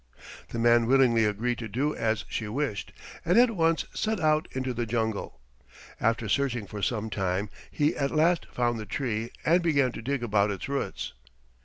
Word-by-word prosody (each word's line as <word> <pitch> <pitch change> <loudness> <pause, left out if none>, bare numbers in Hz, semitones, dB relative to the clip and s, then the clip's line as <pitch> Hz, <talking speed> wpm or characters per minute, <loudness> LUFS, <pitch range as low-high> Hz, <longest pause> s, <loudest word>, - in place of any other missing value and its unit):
The - - -5
man 120 0 +4
willingly 125 -4 +4
agreed 115 +3 -1
to 115 - -4
do 135 +8 -1
as 110 -1 -1
she 110 - -3
wished 115 -2 -3 0.3
and 175 +5 +3
at 245 0 +6
once 165 -5 +1
set 220 -2 -1
out 155 +1 +2
into 130 -1 -2
the 120 -1 -2
jungle. 110 - -2 0.6
After 115 0 +1
searching 120 -1 0
for 105 0 -7
some 110 0 -1
time 95 +1 -1 0.2
he 150 +1 +1
at 140 -1 0
last 165 +3 +2
found 120 -2 -1
the 105 - -7
tree 115 -2 -2 0.2
and 170 +3 +4
began 140 -6 +2
to 115 - -7
dig 135 +1 -2
about 105 -2 +2
its 100 -3 -4
roots. 140 0 -3
120 Hz, 180 wpm, -27 LUFS, 110-145 Hz, 0.6 s, at